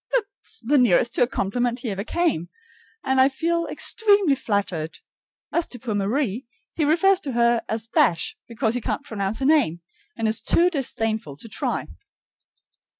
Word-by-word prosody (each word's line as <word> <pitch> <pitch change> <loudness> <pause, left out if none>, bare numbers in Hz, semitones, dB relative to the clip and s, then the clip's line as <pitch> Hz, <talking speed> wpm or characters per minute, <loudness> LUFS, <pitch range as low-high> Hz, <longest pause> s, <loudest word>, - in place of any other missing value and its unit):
That's 445 -1 -4
the 285 +4 +3
nearest 235 0 +3
to - - -1
a 245 - +5
compliment 240 +2 -1
he 235 - -3
ever 195 0 -3
came, 310 - -1 0.5
and 265 -1 +3
I 265 - +5
feel 335 +5 -1
extremely 405 -8 +3
flattered. 195 -10 -2 0.6
As 340 - +1
to 245 - -8
poor 235 -2 -4
Marie, 220 +3 -1 0.3
he 310 - +1
refers 365 +5 +4
to 280 -8 -5
her 235 0 +3
as 220 0 -2
"Bash" 175 -6 +1
because 230 -1 -1
he 245 - -2
can't - - -3
pronounce 200 -1 -1
her 265 - -2
name, 270 - +3 0.4
and 225 - 0
is 220 0 -1
too 355 +1 +3
disdainful 225 - -2
to 185 - -8
try. - - -2
240 Hz, 165 wpm, -23 LUFS, 215-300 Hz, 0.6 s, a